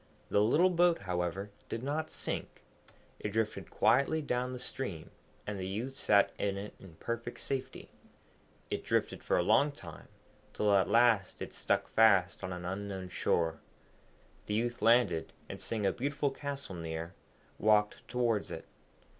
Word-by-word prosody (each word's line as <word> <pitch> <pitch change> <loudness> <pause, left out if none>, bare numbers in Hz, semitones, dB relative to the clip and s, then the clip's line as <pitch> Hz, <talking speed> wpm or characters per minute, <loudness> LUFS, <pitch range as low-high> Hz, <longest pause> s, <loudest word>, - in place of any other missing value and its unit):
The 100 - +3
little 160 - +4
boat, 175 -1 +3
however, 90 +2 -2 0.2
did 115 - -4
not 155 +3 -2
sink, - - -4 0.6
it 105 - -3
drifted 110 +1 -2
quietly 140 +7 +3
down 125 -4 -1
the 130 - -5
stream, 125 -9 -5 0.3
and 105 -2 -4
the 95 - -3
youth 115 +8 -3
sat 100 -5 +4
in 100 -1 0
it 100 +1 -6
in 90 -4 -13
perfect 115 +5 -5
safety. 135 -1 -4 0.8
It - - -2
drifted - - 0
for - - +2
a - - +3
long 145 +1 +4
time, 85 - -11 0.5
till 105 -1 +2
at 95 -1 +4
last 115 -5 +3
it - - -6
stuck - - 0
fast 100 -5 +4
on 90 - -3
an 90 -1 -5
unknown 95 0 -4
shore. 80 -3 0 0.9
The 105 - -1
youth 120 +2 -1
landed, 115 -8 +3
and - - -7
seeing 110 -3 -2
a 95 - +4
beautiful 140 +2 -1
castle 140 -5 -5
near, 85 0 -5 0.5
walked 105 -1 +2
towards 120 -4 0
it. - - -7
105 Hz, 155 wpm, -32 LUFS, 95-125 Hz, 0.9 s, little